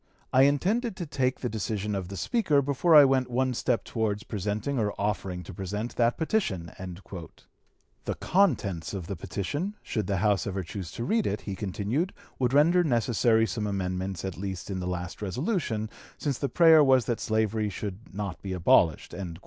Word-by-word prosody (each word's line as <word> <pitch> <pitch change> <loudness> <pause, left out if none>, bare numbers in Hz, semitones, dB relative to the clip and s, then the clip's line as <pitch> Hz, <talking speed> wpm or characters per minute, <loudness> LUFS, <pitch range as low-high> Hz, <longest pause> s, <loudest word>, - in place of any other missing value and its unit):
I 130 +1 +7
intended 195 - +1
to 175 - -4
take 130 -3 -1
the 125 - -1
decision 105 -1 -2
of 95 -3 -3
the 100 +1 -7
Speaker 150 - +2
before 145 +5 +3
I 145 -2 +10
went 130 -2 +2
one 130 +1 +1
step 120 0 0
towards 110 -2 -2
presenting 105 +6 -2
or 105 -2 0
offering 95 -3 -2
to 95 - -9
present 105 +6 -4
that 120 0 +2
petition." 115 - -1 1.3
The - - -2
contents 105 - +1
of 95 -4 -5
the 100 - -4
petition, 145 - -3
should 110 -3 -2
the 100 -1 0
House 100 0 +1
ever 95 -1 -2
choose 90 +1 -6
to 115 - -4
read 220 - +1
it, - - -2
he 100 - -5
continued, 105 - -2 0.3
would 125 -2 +2
render 165 +6 +5
necessary 115 -4 +3
some 105 +1 -3
amendments 95 -1 -3
at 95 -3 -4
least 95 -1 -5
in 95 - -2
the 90 - -3
last 90 +1 -4
resolution, 115 - -1 0.3
since 140 -4 -2
the 140 - -1
prayer 160 -3 +7
was 130 -4 +4
that 120 - -1
slavery 110 -1 0
should 100 +2 -6
not 100 -3 -5
be 95 -2 -4
abolished!" 85 -3 +3
110 Hz, 180 wpm, -28 LUFS, 95-140 Hz, 1.3 s, I